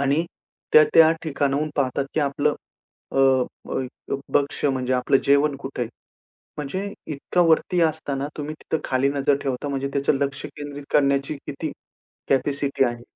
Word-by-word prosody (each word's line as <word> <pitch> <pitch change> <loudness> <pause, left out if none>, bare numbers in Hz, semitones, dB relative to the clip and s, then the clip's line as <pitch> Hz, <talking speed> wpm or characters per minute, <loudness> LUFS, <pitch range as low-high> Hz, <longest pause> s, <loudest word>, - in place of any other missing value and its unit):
आणि 140 +4 +2 0.5
ते 155 - +10
त्या 160 -1 +8
ठिकाणावरून 145 0 0
पाहतात 140 +2 -1
आपलं 145 +1 +1 0.6
अ, - - 0 0.5
अ, - - -1 0.5
भक्ष 140 0 +1
म्हणजे 130 -2 +1
आपलं 125 +2 +3
जेवण 140 0 +3
कुठे 135 -2 -5
आहे? 115 - -3 0.7
म्हणजे 190 +8 -4 0.2
इतका 145 +5 -1
वरती 170 +2 +3
असताना 145 -3 -1
तुम्ही 150 +1 -4
तिथं 160 - -2
खाली 130 +1 +1
नजर 140 0 +2
ठेवता 135 +1 -2
म्हणजे 140 0 -2
त्याचं 140 +1 +2
लक्ष 140 0 -2
केंद्रित 145 -1 -8
करण्याची 140 0 +2
किती 150 +2 -4 0.6
कॅपॅसिटी 140 0 +1
आहे, 120 -1 -2
140 Hz, 140 wpm, -23 LUFS, 135-150 Hz, 0.7 s, ते